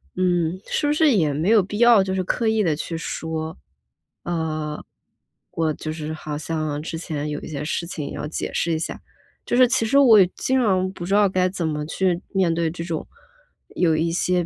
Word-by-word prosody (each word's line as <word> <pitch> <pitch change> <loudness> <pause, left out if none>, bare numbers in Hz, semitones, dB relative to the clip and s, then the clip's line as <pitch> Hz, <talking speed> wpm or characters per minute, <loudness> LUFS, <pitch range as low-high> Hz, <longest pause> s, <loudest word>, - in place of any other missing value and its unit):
嗯， 180 -1 +1
是 295 - -1
不 295 - +2
是 310 -1 +4
也 160 - +2
没 155 +7 0
有 220 -2 +6
必 205 +3 -5
要， 235 -4 +6
就 190 0 -3
是 190 -1 0
刻 225 +5 -1
意 220 -1 +2
地 160 -5 +1
去 165 +2 -4
说？ 160 -1 -4 0.7
啊， 155 -3 -3 0.7
我 160 -2 0
就 155 - -5
是 155 -1 -5
好 155 -1 -5
像 155 -1 -3
之 165 +1 -5
前 150 -3 -4
有 150 0 -3
一 - - -9
些 145 -2 -5
事 170 +2 -2
情 155 -4 -5
要 150 - -5
解 155 - -4
释 170 - 0
一 160 - -1
下。 160 - -4 0.5
就 - - -1
是 255 +1 +7
其 250 -1 +1
实 250 +5 +2
我 240 -7 +7
也 185 - +6
经 260 0 +1
常 185 -4 +1
不 175 -2 -7
知 195 - -1
道 205 -1 +5
该 185 -1 +2
怎 185 -2 -3
么 150 -1 -2
去 180 +2 0
面 185 -4 +2
对 165 0 0
这 165 +1 -6
种， 165 -2 -4 0.7
有 165 -3 +3
一 165 +2 0
些 180 0 +1
170 Hz, 235 characters per minute, -23 LUFS, 155-195 Hz, 0.7 s, 是